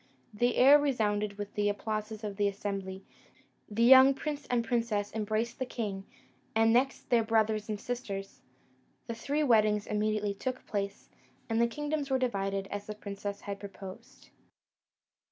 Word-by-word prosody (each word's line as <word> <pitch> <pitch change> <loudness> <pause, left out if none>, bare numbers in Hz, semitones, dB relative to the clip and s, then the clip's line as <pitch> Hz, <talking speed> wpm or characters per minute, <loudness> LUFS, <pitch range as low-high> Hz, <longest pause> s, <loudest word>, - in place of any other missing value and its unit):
The 240 +3 +1
air 280 +3 +8
resounded 210 -7 0
with 205 0 -6
the 205 0 +1
applauses 215 +1 -3
of 205 -2 -5
the 205 -1 +2
assembly: 195 -1 -4 0.7
the 220 +2 0
young 265 +2 +8
prince 290 0 -4
and 240 -2 0
princess 225 -3 -1
embraced 220 +2 -2
the 260 - -1
king, 200 -6 -4 0.5
and 225 0 +4
next 260 +2 +1
their 235 -2 +5
brothers 220 -1 +1
and 210 -1 -2
sisters: 205 -6 -5 0.6
the 230 - -4
three 285 +6 -1
weddings 215 -5 +3
immediately 210 -1 0
took 255 +5 -4
place, 200 -1 -4 0.4
and 225 0 +1
the 235 - +4
kingdoms 295 +3 -3
were 265 - +2
divided 195 -6 -1
as 205 0 -5
the 210 - -5
princess 200 -1 -6
had 200 -1 -5
proposed. 195 -1 -11
215 Hz, 155 wpm, -30 LUFS, 205-245 Hz, 0.7 s, air